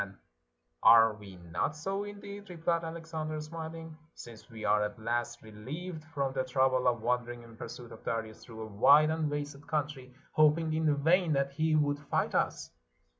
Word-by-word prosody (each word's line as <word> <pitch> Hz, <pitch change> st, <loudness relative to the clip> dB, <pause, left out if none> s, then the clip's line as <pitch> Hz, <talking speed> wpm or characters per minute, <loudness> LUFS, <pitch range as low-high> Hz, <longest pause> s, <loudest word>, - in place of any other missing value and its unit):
''And 100 Hz, 0 st, -6 dB, 0.7 s
are 115 Hz, -1 st, +7 dB
we 105 Hz, -3 st, -12 dB, 0.2 s
not 145 Hz, -, -1 dB
so, 195 Hz, +6 st, -3 dB
indeed," 205 Hz, 0 st, -9 dB
rephed 170 Hz, -1 st, -1 dB
Alexander, 160 Hz, -2 st, -5 dB
smiling, 160 Hz, +1 st, -7 dB, 0.2 s
"since 115 Hz, -2 st, -12 dB
we 110 Hz, -1 st, -7 dB
are 105 Hz, 0 st, +3 dB
at 105 Hz, 0 st, -2 dB
last 120 Hz, +1 st, -2 dB
relieved 150 Hz, -, -7 dB
from 140 Hz, -4 st, -2 dB
the 130 Hz, -1 st, 0 dB
trouble 130 Hz, 0 st, +2 dB
of 120 Hz, -3 st, +1 dB
wandering 120 Hz, 0 st, -1 dB
in 115 Hz, -1 st, -14 dB
pursuit 120 Hz, +1 st, -9 dB
of 110 Hz, -, -12 dB
Darius 110 Hz, -1 st, -4 dB
through 110 Hz, -2 st, -8 dB
a -, -, -10 dB
■^ide 145 Hz, +9 st, +6 dB
and 160 Hz, -2 st, -1 dB
wasted 145 Hz, -1 st, -4 dB
countr}, 145 Hz, -4 st, -3 dB, 0.2 s
hoping 155 Hz, +1 st, +3 dB
in 155 Hz, -2 st, +2 dB
vain 170 Hz, 0 st, +4 dB
that 140 Hz, 0 st, +1 dB
he 155 Hz, +2 st, +1 dB
would 145 Hz, -1 st, +2 dB
fight 145 Hz, -, -1 dB
us? -, -, 0 dB
145 Hz, 175 wpm, -31 LUFS, 120-160 Hz, 0.7 s, are